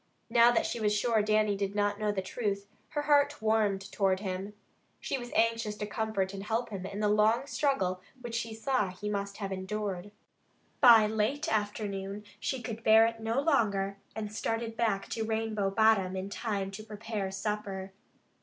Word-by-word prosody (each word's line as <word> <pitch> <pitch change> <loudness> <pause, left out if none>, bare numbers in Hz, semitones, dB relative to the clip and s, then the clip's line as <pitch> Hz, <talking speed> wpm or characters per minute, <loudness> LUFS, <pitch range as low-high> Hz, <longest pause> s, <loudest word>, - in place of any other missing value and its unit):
Now 235 0 +7
that 240 - +2
she - - -2
was 210 -1 +2
sure 225 0 +2
Dannie 215 -1 +2
did 200 0 -2
not 205 0 +1
know 210 -1 +1
the 190 -2 -2
truth, 200 -1 -2 0.2
her 295 -1 -2
heart 290 0 +3
warmed 215 -3 +2
toward 190 -2 +1
him. 195 +1 -4 0.4
She 270 - -2
was 240 0 -8
anxious 230 -2 +1
to 210 - -4
comfort 205 -2 -2
and 195 0 -6
help 225 +3 -1
him 190 -2 -5
in 200 +1 -5
the 210 - +3
long 215 +4 +3
struggle 240 -9 0 0.2
which 240 -2 -7
she 230 -1 -3
saw 255 -1 +1
that 180 0 -9
he 210 +1 -3
must 200 -1 -3
have 195 -2 -4
endured. 190 0 -3 0.7
By 235 -6 +8
late 220 +9 0
afternoon 205 -1 -2 0.2
she 250 +2 -3
could 225 0 -6
bear 220 +1 +7
it 230 0 -2
no 225 +3 0
longer 200 -10 +1 0.2
and 210 -1 -5
started 225 +1 -2
back 220 -4 0
to 225 - -2
Rainbow 220 -2 -1
Bottom 195 -3 +3
in 190 +1 -4
time 200 -3 -2
to 205 +2 -8
prepare 215 -2 -4
supper. 195 -1 -4
210 Hz, 180 wpm, -30 LUFS, 200-225 Hz, 0.7 s, By